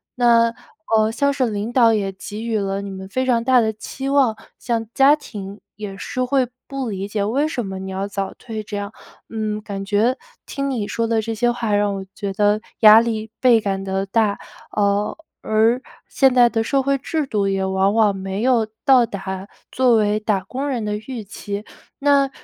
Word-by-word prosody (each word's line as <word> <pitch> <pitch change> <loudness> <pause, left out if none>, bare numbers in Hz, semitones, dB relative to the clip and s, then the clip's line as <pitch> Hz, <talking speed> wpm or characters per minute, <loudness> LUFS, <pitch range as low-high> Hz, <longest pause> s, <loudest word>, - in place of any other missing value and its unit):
那， 235 -1 +4 0.4
呃， 215 0 +3
像 280 +5 +1
是 265 -4 0
领 210 +2 -3
导 235 -2 +5
也 200 -3 0
给 205 +3 -8
予 225 -2 0
了 195 0 -2
你 200 0 -6
们 190 0 -7
非 255 +7 -1
常 240 -3 +2
大 250 +1 +4
的 220 -1 +1
期 245 +5 -6
望， 270 -5 +3 0.2
像 230 -2 -1
家 275 +2 +6
庭 205 -8 -9 0.2
也 205 -2 -6
是 255 - -4
会 255 -1 +1 0.2
不 270 -3 -4
理 195 -1 -4
解， 205 0 -2
为 265 +9 +1
什 250 -8 -3
么 190 -1 -5
你 190 0 -6
要 190 +1 -3
早 195 -1 -3
退， 225 -3 -6
这 210 0 -7
样。 205 0 -4 0.4
嗯， 215 -1 -3
感 200 -2 -6
觉 215 +6 +2 0.3
听 275 -1 -3
你 240 -6 -2
说 230 +2 -2
的 225 -1 +1
这 225 +1 -3
些 240 +2 +1
话， 240 -3 -1
让 205 -1 +1
我 195 0 -6
觉 200 -2 -4
得 205 +1 +2 0.2
压 215 0 +10
力 220 -1 -2
倍 240 -3 +5
感 195 -2 -2
地 195 0 -1
大， 205 0 +1 0.3
啊， 205 0 +1 0.3
而 225 +3 +2 0.3
现 265 -2 +3
在 245 -1 +6
的 225 -1 0
社 270 +4 +1
会 275 +1 +1
制 310 +3 -2
度， 210 -6 0
也 195 -1 0
往 190 +1 +1
往 215 -3 +3
没 195 +1 -4
有 240 -4 +3 0.2
到 260 -4 +6
达 190 -2 -6 0.2
作 250 -2 +3
为 210 -1 +2
打 210 -3 0
工 265 +9 -4
人 250 -5 -2
的 210 0 -1
预 225 +1 -7
期。 205 0 -6 0.4
那 280 -1 +3
220 Hz, 215 characters per minute, -21 LUFS, 200-245 Hz, 0.4 s, 压